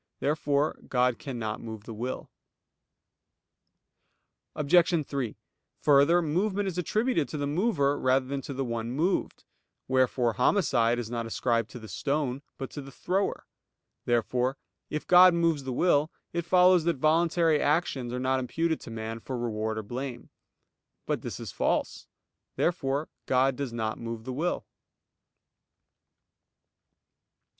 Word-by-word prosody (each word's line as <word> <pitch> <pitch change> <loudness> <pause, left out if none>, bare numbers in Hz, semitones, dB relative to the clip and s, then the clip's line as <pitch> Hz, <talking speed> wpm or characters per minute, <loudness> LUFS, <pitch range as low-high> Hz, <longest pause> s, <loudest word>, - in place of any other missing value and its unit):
Therefore 145 0 0
God 125 -1 +1
cannot 120 -7 -4
move 110 -2 -7
the 115 - -8
will. 120 +4 -5 2.2
Obj. 165 +1 +3
3: 130 -6 -3 0.4
Further, 150 +4 +5
movement 195 +6 0
is 180 -2 -2
attributed 215 - 0
to 155 - -4
the 145 - -1
mover 145 -3 +1
rather 130 0 +2
than 135 +1 -3
to 140 - -6
the 135 0 -1
one 115 -1 -3
moved; 170 +8 -1 0.4
wherefore 130 -2 +2
homicide 125 - +2
is 120 -1 -4
not 115 -1 -3
ascribed 115 -1 0
to - - -9
the 110 -2 -10
stone, 135 +6 -2 0.2
but 135 - -6
to 145 - -6
the 135 0 -11
thrower. 190 +8 -1 0.6
Therefore, 125 +2 +1 0.3
if 150 - -3
God 180 0 +7
moves 165 -5 +1
the 130 - -3
will, 150 +2 +2 0.2
it 170 -1 -2
follows 180 -1 +5
that 170 -1 +2
voluntary 160 +1 +3
actions 145 -5 0
are 125 - -3
not 130 +1 +1
imputed 160 +6 -1
to - - -9
man 115 0 -5
for 130 +2 -5
reward 110 -2 -2
or 110 - -3
blame. 125 +3 -6 0.7
But - - -1
this - - -6
is - - -6
false. - - -1 0.5
Therefore 145 -3 0 0.2
God 130 +1 +3
does 140 -2 -4
not 110 -2 -3
move 115 -1 -5
the 130 +2 -5
will. 165 +7 -1
135 Hz, 140 wpm, -28 LUFS, 120-165 Hz, 2.2 s, God